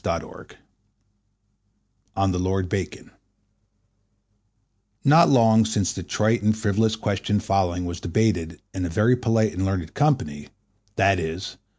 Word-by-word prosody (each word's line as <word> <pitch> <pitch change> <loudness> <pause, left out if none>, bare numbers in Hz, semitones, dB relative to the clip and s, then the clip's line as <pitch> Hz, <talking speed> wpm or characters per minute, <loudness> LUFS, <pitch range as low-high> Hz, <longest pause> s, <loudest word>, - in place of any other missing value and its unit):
Letter - - -5
XII—On 105 -1 -10
the 90 - -2
Lord 95 0 -1
Bacon 95 -4 -5 1.9
NOT 160 +4 +6
long 115 -4 +5
since 105 -4 -1
the 95 - -6
trite 110 +6 0
and 110 +1 +1
frivolous 110 0 +1
question 105 -1 -1
following 90 -3 -1
was 85 0 -5
debated 85 -3 -1
in 95 - -4
a - - -3
very 105 +9 +3
polite 115 -3 0
and 95 - -3
learned 95 -4 -3
company, 75 - 0 0.5
viz. 90 -1 0
100 Hz, 120 wpm, -23 LUFS, 90-110 Hz, 1.9 s, NOT